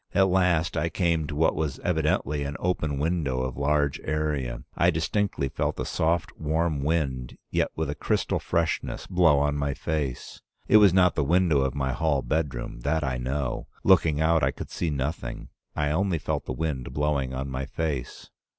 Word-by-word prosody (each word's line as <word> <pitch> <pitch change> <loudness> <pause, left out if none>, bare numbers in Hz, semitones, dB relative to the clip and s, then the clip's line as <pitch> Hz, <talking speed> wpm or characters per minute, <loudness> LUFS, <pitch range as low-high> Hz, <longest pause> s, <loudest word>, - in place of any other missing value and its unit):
At 95 -1 +5
last 90 -3 +2
I 85 - 0
came 85 -3 0
to 75 - -5
what 80 +2 +3
was 75 -3 -2
evidently 75 +1 0
an 70 0 -4
open 80 -5 -1
window 75 -4 0
of 65 -1 -3
large 75 0 +1
area. 75 -5 -2
I 85 - +4
distinctly 80 -1 0
felt - - -2
a - - -1
soft, 80 +1 0
warm 80 -1 0
wind, 70 -6 -1
yet - - +1
with 80 -1 -1
a 70 - -2
crystal - - 0
freshness, 85 -1 -1
blow 85 -5 +4
on 75 +1 +1
my 70 -1 -1
face. 75 -6 -3 0.3
It 110 - +7
was 105 -3 +7
not 90 0 +4
the 80 - 0
window 85 -1 +3
of 65 0 -1
my 65 -2 0
hall 75 -2 +1
bedroom, 65 -3 -2
that 75 +5 0
I 65 -3 -1
know. 65 +1 -2 0.2
Looking 80 -5 +4
out, 80 0 +3
I - - +3
could - - -7
see 85 - -1
nothing. 75 +3 -4 0.3
I 75 0 0
only 90 +2 +1
felt 75 -1 -3
the - - -4
wind 65 -3 -3
blowing 70 -3 0
on 65 +1 -3
my 65 +1 -3
face. 70 -4 -4
75 Hz, 185 wpm, -26 LUFS, 70-80 Hz, 0.3 s, It